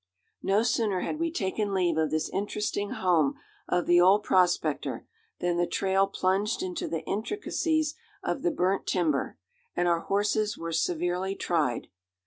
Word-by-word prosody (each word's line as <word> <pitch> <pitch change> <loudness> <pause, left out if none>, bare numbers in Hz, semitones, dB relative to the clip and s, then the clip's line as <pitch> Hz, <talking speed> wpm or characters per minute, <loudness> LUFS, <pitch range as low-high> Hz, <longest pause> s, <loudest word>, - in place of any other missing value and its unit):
No 200 +3 +2
sooner 220 -5 +1
had 305 - -3
we 335 0 0
taken 200 - -1
leave 175 -3 +2
of 160 -1 +1
this 155 0 0
interesting 205 0 -2
home 165 -7 +2 0.3
of 175 -1 +1
the 175 0 +5
old 195 +4 +5
prospector, 175 -5 +1 0.3
than 175 -1 0
the 175 0 +2
trail 195 0 +2
plunged 195 - 0
into 360 -3 -3
the 165 -2 -3
intricacies 315 - -1 0.3
of 280 - -2
the - - +2
burnt 185 +3 0
timber, 160 -6 0 0.4
and 175 - +1
our 170 -1 +3
horses 205 +3 0
were 165 0 -5
severely 175 +3 0
tried. 155 -12 0
190 Hz, 150 wpm, -28 LUFS, 175-210 Hz, 0.4 s, the